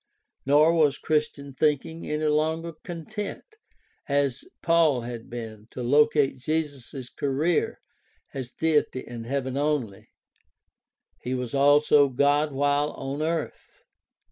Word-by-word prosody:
Nor 150 +4 +5
was 150 -4 +3
Christian 150 -2 -2
thinking 150 +3 -1
any 150 +1 -1
longer 160 +2 0
content 190 +5 -6 0.7
as 140 -3 0 0.2
Paul 165 -6 +3
had 115 -1 -7
been 110 -3 -8
to 125 - -6
locate 145 +1 +3
Jesus' 145 -3 -3
career 145 +5 0 0.6
as 130 -3 -5
Deity 150 -3 0
in 115 -1 -8
heaven 130 +1 -2
only; 140 -9 -2 1.1
he 125 +1 -3
was 125 -2 -4
also 145 +1 +5
God 145 +3 +2
while 145 +2 +1
on 140 +2 -5
earth. 160 0 -4
145 Hz, 115 wpm, -26 LUFS, 130-155 Hz, 1.1 s, Nor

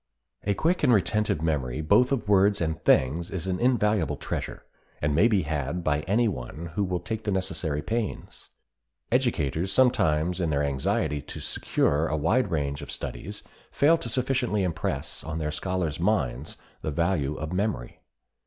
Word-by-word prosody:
A 100 0 +1
quick 170 - +1
and - - +4
retentive 105 -6 +2
memory 70 -5 -1
both 105 - +4
of 125 -7 -1
words 100 0 +4
and 80 -2 -2
things 80 +7 +3
is 95 -2 -4
an 95 -1 -1
invaluable 105 - +2
treasure, - - -5 0.3
and 75 0 0
may 85 +10 +5
be 105 -6 +2
had 75 +3 -2
by 75 -2 +1
any 115 +5 +3
one 80 - -5
who 100 - 0
will 90 -2 -1
take 110 +2 -5
the 105 - -2
necessary 80 -6 -1
pains. 115 -2 -4 0.6
Educators 95 - +1
sometimes 90 -9 +2
in 85 - +1
their 75 -1 +1
anxiety 70 +1 0
to - - -8
secure 75 +3 0
a 80 - -1
wide 100 - +2
range 70 -4 -2
of - - -8
studies - - -6 0.3
fail 150 +4 +4
to 120 - -5
sufficiently 125 -4 0
impress 85 -4 -3
on 80 0 -4
their 75 -1 -2
scholars' 85 -1 -2
minds 75 - 0 0.2
the - - -2
value 75 -2 0
of 80 +3 -5
memory. 95 - -2
90 Hz, 165 wpm, -26 LUFS, 75-105 Hz, 0.6 s, may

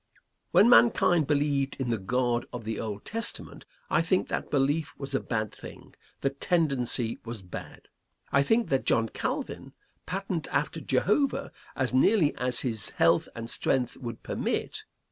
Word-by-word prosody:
When 215 - +6
mankind 180 - +5
believed 145 -2 +1
in 130 -3 -2
the 115 - 0
God 120 +4 0
of 125 -2 -6
the 110 0 -4
Old 105 -2 -5
Testament, 230 +1 -2 0.2
I - - +2
think 180 +3 +1
that - - -3
belief 145 +2 0
was 135 -1 -5
a 135 - +2
bad 110 -3 -2
thing; - - -12 0.3
the 135 - +1
tendency 135 -7 0
was 115 -4 -7
bad. 90 - -9 0.4
I 140 - +4
think 225 +11 +2
that 135 -1 0
John 115 -1 +3
Calvin - - -4 0.3
patterned 185 -3 -3
after - - -1
Jehovah 280 -2 +1 0.2
as 130 -1 -1
nearly 155 +4 +4
as 125 -1 0
his 115 -5 -2
health - - +2
and 115 0 -6
strength 125 +1 0
would 120 -3 -7
permit. - - -3
135 Hz, 155 wpm, -28 LUFS, 120-160 Hz, 0.4 s, When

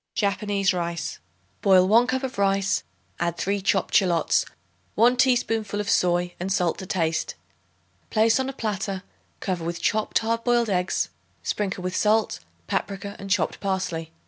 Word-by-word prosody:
Japanese 200 -2 +1
Rice. 170 -1 -3 0.4
Boil 185 -3 +5
1 230 +4 +5
cup 260 +1 -1
of 260 -6 -4
rice; 195 0 +2 0.4
add 170 0 -1
3 200 +3 -1
chopped 195 0 +1
shallots, 175 -4 +3 0.5
1 240 +3 +5
teaspoonful 225 -5 +1
of 205 - -1
soy 175 0 +2
and 185 +2 -3
salt 180 -3 +1
to 190 - -7
taste. 165 -3 -1 0.7
Place 225 +3 +3
on 265 0 -1
a - - -5
platter, 200 -5 -3 0.4
cover 180 -3 -2
with 170 +1 -3
chopped 215 +4 +1
hard 230 +1 0
boiled 240 -3 +2
eggs, 180 0 0 0.3
sprinkle 195 -3 -2
with 185 0 -3
salt, 215 +1 +2 0.3
paprica 200 - -3
and 195 - -7
chopped 190 -4 +1
parsley. 185 -5 -2
195 Hz, 150 wpm, -25 LUFS, 180-215 Hz, 0.7 s, Boil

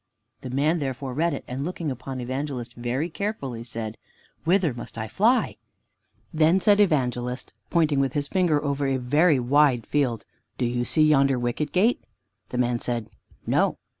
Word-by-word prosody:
The 130 - -6
man 150 +6 +1
therefore 135 -2 -4
read 165 +5 +1
it, - - -7
and 130 +2 -4
looking 165 -2 -3
upon 130 +1 -6
Evangelist 130 -1 -4
very 120 +6 -2
carefully, 160 - -4
said, 115 -2 -6 0.5
"Whither 175 -4 +3
must 120 - -9
I 110 -1 -3
fly!" 230 - +2 0.8
Then 160 +4 +4
said 205 +2 +4
Evangelist, 125 -9 0 0.2
pointing 155 -5 +2
with 135 -1 +1
his 145 -2 -1
finger 160 -4 +1
over 140 0 0
a 135 -1 +1
very 145 +4 +3
wide 130 -1 +3
field, 130 -6 0 0.3
"Do 125 - 0
you 120 0 -1
see 155 +5 +3
yonder 140 -3 +4
Wicket 120 +5 -2
gate?" 215 +7 +2 0.5
The 125 - -4
man 120 -1 +1
said, 115 -3 -3 0.3
"No." - - +2
135 Hz, 165 wpm, -25 LUFS, 125-155 Hz, 0.8 s, Then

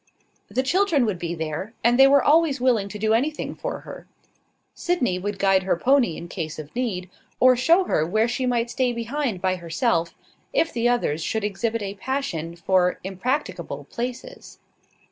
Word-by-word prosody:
The 260 - 0
children 330 -3 +2
would 200 -5 -2
be 170 0 -3
there; 160 +7 -5
and 240 +2 +3
they 270 - +9
were 280 0 +5
always 305 -2 +3
willing 235 -6 +2
to 210 - -7
do 220 +1 +1
anything 285 +7 -1
for - - -5
her. - - -11 0.7
Sydney 255 - 0
would 205 +1 -4
guide 195 -1 +3
her 185 -2 0
pony 245 - +2
in 170 - -8
case 165 -3 -5
of 155 +3 -9
need, 210 -8 -2 0.3
or 255 0 +6
show 330 +10 +4
her 155 - +1
where 215 +8 +1
she 250 +2 -2
might 240 -1 0
stay 255 -2 0
behind 235 -4 -3
by 185 0 +1
herself, 170 0 -1 0.4
if 330 - +1
the 235 0 +1
others 165 -11 0
should 220 +6 -2
exhibit 220 +2 -2
a 195 0 -4
passion 195 - -3
for 180 +1 +2
impracticable 220 +10 -3
places. 255 - -6
230 Hz, 175 wpm, -24 LUFS, 185-260 Hz, 0.7 s, they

